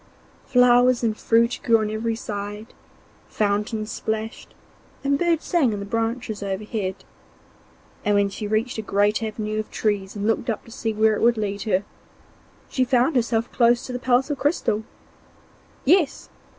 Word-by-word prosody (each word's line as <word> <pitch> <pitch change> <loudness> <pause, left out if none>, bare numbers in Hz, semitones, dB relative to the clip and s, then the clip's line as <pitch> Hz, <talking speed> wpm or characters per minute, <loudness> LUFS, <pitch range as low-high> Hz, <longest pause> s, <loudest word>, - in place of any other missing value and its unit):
Flowers 250 -1 +5
and 220 -2 +1
fruit 235 +2 +2
grew 230 -2 +5
on 215 -1 -2
every 225 +1 -1
side, 210 0 -6 0.5
fountains 210 +1 -1
plashed, 220 +1 -4 0.5
and 280 0 +1
birds 340 -2 +1
sang 285 -10 +2
in 205 - -3
the 200 - -5
branches 225 0 -2
overhead, 200 0 -3 1.0
and 205 0 +2
when 200 0 +3
she 205 +2 -5
reached 220 +3 -1
a - - -1
great 205 +1 +1
avenue 215 -1 -3
of 215 - -4
trees 205 -3 -1
and 205 0 -3
looked 225 +3 0
up 225 - -3
to 230 - -14
see 225 -2 -2
where 220 0 +3
it - - -4
would 235 0 +4
lead 205 -1 -2
her, 195 -3 +1 0.8
she 260 - 0
found 255 +4 +2
herself 235 -1 0
close 240 0 +3
to 255 - -6
the 250 - -3
palace 255 +3 +2
of 285 - -3
crystal. 275 -7 0 1.0
Yes! 325 0 +2
225 Hz, 165 wpm, -23 LUFS, 210-245 Hz, 1.0 s, Flowers